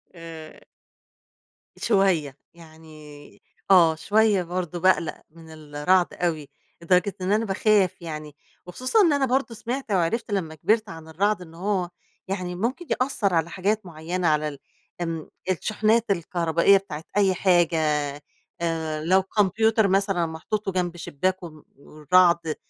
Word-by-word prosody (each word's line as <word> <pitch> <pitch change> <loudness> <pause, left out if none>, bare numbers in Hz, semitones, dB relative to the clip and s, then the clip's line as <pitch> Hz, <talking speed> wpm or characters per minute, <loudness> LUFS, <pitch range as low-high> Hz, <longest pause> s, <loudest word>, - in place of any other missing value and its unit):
آآ 165 -2 -10 1.2
شوية، 185 - +1 0.2
يعني 155 -3 -15 0.3
آه 165 -4 +6
شوية 205 +1 +2
برضه 175 0 -4
باقلق 185 -3 +1
من 165 0 -16
الرعد 155 +4 0
أوي 160 -5 -2 0.3
لدرجة 180 +2 +2
إن 185 +2 -1
أنا 220 +2 +2
باخاف 195 -2 +1
يعني، 155 -3 -7 0.3
وخصوصًا 255 - +1
إن 330 -6 +4
أنا 280 -1 +2
برضه 255 -2 -1
سمعت 245 +1 -5
وعرفت 200 +5 0
لما 165 -6 -2
كبرت 215 +6 +1
عن 165 -1 -10
الرعد 200 +4 0
إن 165 -2 -12
هو 185 0 -2 0.4
يعني 180 -2 -4
ممكن 250 - -3 0.2
يأثر 215 -8 0
على 165 0 +1
حاجات 205 +3 -1
معينة 170 +2 -3
على 150 0 +2
ال 140 -2 -7 0.4
آمم 165 -2 -4 0.2
الشحنات 215 +4 +1
الكهربائية 170 +1 +2
بتاعة 160 -5 -7
أي 195 -2 +4
حاجة 175 -3 +2 0.8
آآ 160 -2 -2
لو 190 +3 +3
كمبيوتر 215 +2 +2
مثلًا 195 -2 +1
محطوط، 180 +6 -4
وجنب 180 -2 -2
شباك، 185 +5 -2
وم 155 -3 -11
والرعد 165 +3 +2
180 Hz, 130 wpm, -24 LUFS, 160-200 Hz, 1.2 s, آه